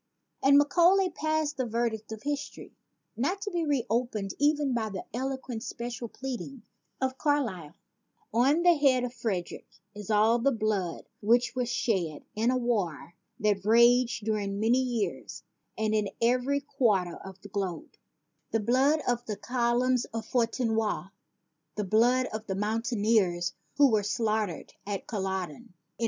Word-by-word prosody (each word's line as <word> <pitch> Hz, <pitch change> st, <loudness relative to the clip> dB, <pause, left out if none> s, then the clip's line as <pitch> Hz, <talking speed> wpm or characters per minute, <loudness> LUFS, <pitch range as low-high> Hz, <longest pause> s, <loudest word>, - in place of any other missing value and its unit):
And 280 Hz, +1 st, +6 dB
Macaulay 350 Hz, +6 st, +4 dB
passed 310 Hz, -1 st, -1 dB
the 260 Hz, -, 0 dB
verdict 225 Hz, -1 st, -2 dB
of 220 Hz, -1 st, -7 dB
history, 290 Hz, -1 st, -5 dB, 0.4 s
not 345 Hz, -, -1 dB
to 410 Hz, -1 st, -4 dB
be 345 Hz, -2 st, -1 dB
reopened 240 Hz, -7 st, -1 dB
even 290 Hz, -2 st, +2 dB
by 225 Hz, -2 st, -1 dB
the 195 Hz, -3 st, -6 dB
eloquent 260 Hz, -2 st, -4 dB
special 240 Hz, -1 st, -5 dB
pleading 265 Hz, 0 st, -6 dB, 0.4 s
of 260 Hz, 0 st, -2 dB
Carlyle: 235 Hz, -, -1 dB, 0.6 s
"On 275 Hz, +8 st, +3 dB
the 350 Hz, -1 st, +7 dB
head 275 Hz, -5 st, +3 dB
of 250 Hz, -1 st, -3 dB
Frederick 215 Hz, -7 st, -4 dB, 0.3 s
is 210 Hz, -1 st, -9 dB
all 220 Hz, +2 st, +4 dB
the 275 Hz, +4 st, +2 dB
blood 215 Hz, -7 st, -2 dB, 0.2 s
which 240 Hz, +4 st, +3 dB
was 250 Hz, -2 st, -1 dB
shed 190 Hz, -10 st, -1 dB
in 225 Hz, +3 st, +1 dB
a 255 Hz, -, +2 dB
war 205 Hz, -, -2 dB, 0.3 s
that 205 Hz, -2 st, +1 dB
raged 235 Hz, +1 st, +4 dB
during 205 Hz, -2 st, -1 dB
many 230 Hz, +4 st, +3 dB
years 245 Hz, -5 st, -3 dB, 0.3 s
and 220 Hz, 0 st, 0 dB
in 210 Hz, -2 st, +1 dB
every 255 Hz, +4 st, +2 dB
quarter 195 Hz, -12 st, 0 dB
of 190 Hz, 0 st, -11 dB
the 205 Hz, -, -11 dB
globe, 190 Hz, -5 st, -4 dB, 0.6 s
the 225 Hz, -, 0 dB
blood 265 Hz, +8 st, +2 dB
of 240 Hz, -1 st, 0 dB
the 210 Hz, -2 st, -3 dB
column 245 Hz, +1 st, +1 dB, 0.2 s
of 225 Hz, -, -3 dB
Fontenoy, 225 Hz, -5 st, 0 dB, 0.7 s
the 210 Hz, -, -1 dB
blood 240 Hz, +6 st, +3 dB
of 215 Hz, 0 st, -5 dB
the 190 Hz, -, -2 dB
moun 215 Hz, +3 st, -1 dB
taineers 205 Hz, -7 st, +1 dB, 0.2 s
who 285 Hz, -3 st, +6 dB
were 215 Hz, -1 st, +3 dB
slaughtered 210 Hz, -3 st, -2 dB
at 200 Hz, -1 st, -4 dB
Collodcn.... 190 Hz, -, -4 dB
230 Hz, 145 wpm, -28 LUFS, 210-260 Hz, 0.7 s, the